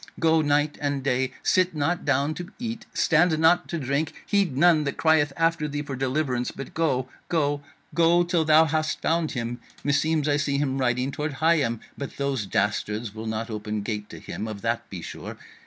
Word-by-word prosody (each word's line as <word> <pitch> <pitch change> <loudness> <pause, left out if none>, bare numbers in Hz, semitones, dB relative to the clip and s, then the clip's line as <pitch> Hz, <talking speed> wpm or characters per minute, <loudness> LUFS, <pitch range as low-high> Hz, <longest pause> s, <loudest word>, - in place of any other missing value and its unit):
Go 160 -1 +4
night 145 0 +1
and 140 -2 -1
day, 130 -1 +1
sit 185 -2 +2
not 155 +4 -1
down 145 +2 +2
to 175 +2 -7
eat, 235 -1 -5
stand 160 0 +3
not 170 +3 +4
to 170 - -3
drink; 140 +2 -1
heed 195 -10 +1
none 165 -1 +5
that 140 - -3
crieth 160 -3 +3
after 165 -2 +1
thee 145 0 -3
for 140 -2 -5
deliverance, 130 -1 -1
but 135 +6 -8
go, 150 -6 0 0.2
go, 145 -3 +1 0.3
go 170 +1 +4
till 170 -1 +1
thou 155 +1 +6
hast 155 0 -1
found 165 -1 +1
him. 120 -1 -3 0.2
Meseems 150 +2 +1
I 145 -1 +3
see 140 -1 0
him 135 -1 0
riding 125 +1 +1
toward 150 +1 -3
Higham, 140 -6 +2 0.2
but 140 - -6
those 135 -7 -1
dastards 105 +2 -1
will 110 +1 -6
not 110 +1 -3
open 105 -1 -3
gate 105 -1 -4
to - - -9
him, 110 - -6
of 105 -2 -7
that - - -1
be - - -7
sure. - - -7
145 Hz, 190 wpm, -25 LUFS, 130-160 Hz, 0.3 s, thou